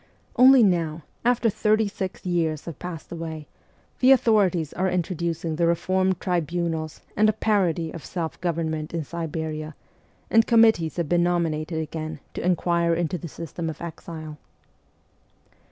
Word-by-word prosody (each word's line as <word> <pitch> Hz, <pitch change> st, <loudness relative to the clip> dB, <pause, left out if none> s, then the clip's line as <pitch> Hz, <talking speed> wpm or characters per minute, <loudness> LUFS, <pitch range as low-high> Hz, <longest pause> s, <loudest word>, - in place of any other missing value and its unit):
Only 260 Hz, -1 st, +8 dB
now, 165 Hz, -5 st, +1 dB, 0.2 s
after 240 Hz, -1 st, +2 dB
thirty 215 Hz, 0 st, +2 dB
six 190 Hz, -2 st, -5 dB
years 165 Hz, -4 st, 0 dB
have 165 Hz, -4 st, -7 dB
passed 175 Hz, -3 st, -7 dB
away, 160 Hz, -2 st, -6 dB, 0.5 s
the 255 Hz, -, +5 dB
authorities 205 Hz, -, +3 dB
are 190 Hz, +1 st, 0 dB
introducing 170 Hz, -2 st, -2 dB
the 170 Hz, 0 st, +2 dB
reformed 185 Hz, +2 st, +1 dB
tribunals 170 Hz, -3 st, -2 dB
and 215 Hz, +1 st, +4 dB
a -, -, +2 dB
parody 180 Hz, -7 st, +1 dB
of 165 Hz, -, -8 dB
self 165 Hz, -3 st, -5 dB
government 160 Hz, -2 st, -2 dB
in 165 Hz, -, -1 dB
Siberia, 155 Hz, -1 st, -5 dB, 0.6 s
and 225 Hz, 0 st, +5 dB
committees 220 Hz, -8 st, +4 dB
have 170 Hz, -3 st, -1 dB
been 175 Hz, +2 st, +2 dB
nominated 165 Hz, -2 st, 0 dB
again 155 Hz, -1 st, -5 dB
to -, -, -5 dB
inquire 170 Hz, -1 st, +2 dB
into 170 Hz, +1 st, -1 dB
the 170 Hz, -, -6 dB
system 165 Hz, +1 st, -5 dB
of 155 Hz, -, -7 dB
exile. 160 Hz, -2 st, -8 dB
170 Hz, 140 wpm, -25 LUFS, 160-185 Hz, 0.6 s, Only